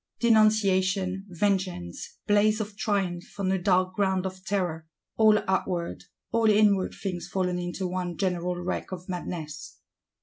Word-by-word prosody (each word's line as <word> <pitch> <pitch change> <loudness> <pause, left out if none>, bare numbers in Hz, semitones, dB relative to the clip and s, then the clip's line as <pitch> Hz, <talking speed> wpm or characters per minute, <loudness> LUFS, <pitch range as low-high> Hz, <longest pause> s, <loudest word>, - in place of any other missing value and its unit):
Denunciation, 195 -4 +3
vengeance; 180 - -2
blaze 210 +1 +3
of 210 -1 -4
triumph 195 -4 -2
on 190 -1 +1
a 190 -1 0
dark 185 0 +2
ground 190 -1 +1
of 185 0 -6
terror: 175 -5 -2 0.3
all 215 -1 +6
outward, 180 -2 -1 0.3
all 230 -1 +3
inward 205 -2 +3
things 180 -3 -4
fallen 180 -2 -1
into 175 +2 -3
one 180 -2 -3
general 180 -2 -1
wreck 175 +2 -4
of 185 -1 -7
madness! 165 -4 -6
185 Hz, 135 wpm, -27 LUFS, 180-205 Hz, 0.3 s, all